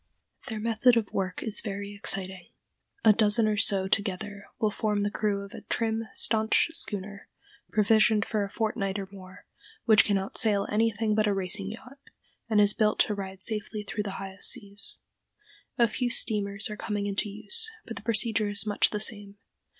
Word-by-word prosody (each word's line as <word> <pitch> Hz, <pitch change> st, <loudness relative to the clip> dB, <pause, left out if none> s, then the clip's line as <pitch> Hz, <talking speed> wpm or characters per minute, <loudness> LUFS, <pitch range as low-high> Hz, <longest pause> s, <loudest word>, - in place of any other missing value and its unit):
Their 220 Hz, -3 st, -5 dB
method 230 Hz, +2 st, +3 dB
of 220 Hz, -3 st, -2 dB
work 185 Hz, -2 st, -3 dB
is 220 Hz, -2 st, +7 dB
very 200 Hz, -1 st, -6 dB
exciting. 190 Hz, -2 st, +1 dB, 0.6 s
A 215 Hz, -, +8 dB
dozen 215 Hz, +1 st, +3 dB
or 215 Hz, -, +1 dB
so 195 Hz, -2 st, +2 dB
together 200 Hz, 0 st, -2 dB
will 215 Hz, -1 st, 0 dB
form 210 Hz, -1 st, -1 dB
the 205 Hz, -, -1 dB
crew 205 Hz, -2 st, -2 dB
of 200 Hz, -, -11 dB
a -, -, -9 dB
trim, 225 Hz, -1 st, -2 dB
stanch 220 Hz, +8 st, +1 dB
schooner, 205 Hz, -, -6 dB, 0.4 s
provisioned 215 Hz, 0 st, +3 dB
for 215 Hz, -2 st, -1 dB
a 200 Hz, -, -5 dB
fortnight 210 Hz, -3 st, -2 dB
or 195 Hz, -1 st, -5 dB
more, 190 Hz, -1 st, -13 dB, 0.4 s
which 215 Hz, -2 st, +6 dB
can 200 Hz, -2 st, +1 dB
outsail 200 Hz, +1 st, +2 dB
anything 220 Hz, 0 st, 0 dB
but 215 Hz, 0 st, +1 dB
a 200 Hz, -, +1 dB
racing 195 Hz, +1 st, 0 dB
yacht, 255 Hz, +5 st, -11 dB, 0.5 s
and 215 Hz, -2 st, +3 dB
is 205 Hz, 0 st, +6 dB
built 215 Hz, -2 st, +1 dB
to 210 Hz, -, +1 dB
ride 190 Hz, -2 st, -7 dB
safely 210 Hz, -1 st, -4 dB
through 210 Hz, +1 st, -4 dB
the 205 Hz, -1 st, -5 dB
highest 195 Hz, 0 st, 0 dB
seas. 205 Hz, -4 st, 0 dB, 0.8 s
A 235 Hz, -2 st, +4 dB
few 245 Hz, +3 st, -2 dB
steamers 210 Hz, -3 st, 0 dB
are 210 Hz, -, -6 dB
coming 205 Hz, -2 st, -3 dB
into 205 Hz, +1 st, -2 dB
use, 445 Hz, -, +1 dB, 0.2 s
but 230 Hz, -, -8 dB
the -, -, -7 dB
procedure 220 Hz, -1 st, 0 dB
is 205 Hz, +1 st, 0 dB
much 205 Hz, -1 st, +1 dB
the 210 Hz, -, -4 dB
same. 205 Hz, -2 st, 0 dB
210 Hz, 180 wpm, -27 LUFS, 200-220 Hz, 0.8 s, A